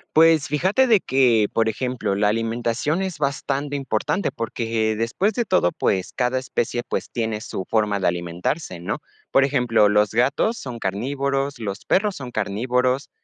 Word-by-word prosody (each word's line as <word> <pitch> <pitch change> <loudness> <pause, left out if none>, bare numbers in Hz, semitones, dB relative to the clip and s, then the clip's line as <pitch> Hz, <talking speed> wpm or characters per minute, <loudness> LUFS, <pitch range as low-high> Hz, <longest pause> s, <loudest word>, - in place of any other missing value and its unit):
Pues 160 -1 +5
fíjate 190 - +2
de 220 -4 +5
que, 125 - +3
por 115 0 +2
ejemplo, 125 -3 -2
la 105 +1 +2
alimentación 115 - -1
es 185 -6 -4
bastante 140 0 -2
importante 135 - -1
porque, 115 -1 -1
después 115 - 0
de 240 +3 -1
todo, 90 - +2
pues, 95 -1 -1
cada 125 0 +1
especie, 120 -2 -2
pues, - - -3
tiene 110 -2 -2
su 95 -3 -5
forma 105 -2 +1
de 95 - +1
alimentarse, 90 - -2
¿no? 85 - -3 0.3
Por 135 - +5
ejemplo, 125 -6 +3
los 105 0 +3
gatos 135 - +1
son 125 - -7
carnívoros, 135 +7 -2
los 100 -3 -5
perros 205 0 +2
son 125 -3 -7
carnívoros, 125 +6 0
125 Hz, 160 wpm, -22 LUFS, 110-140 Hz, 0.3 s, Pues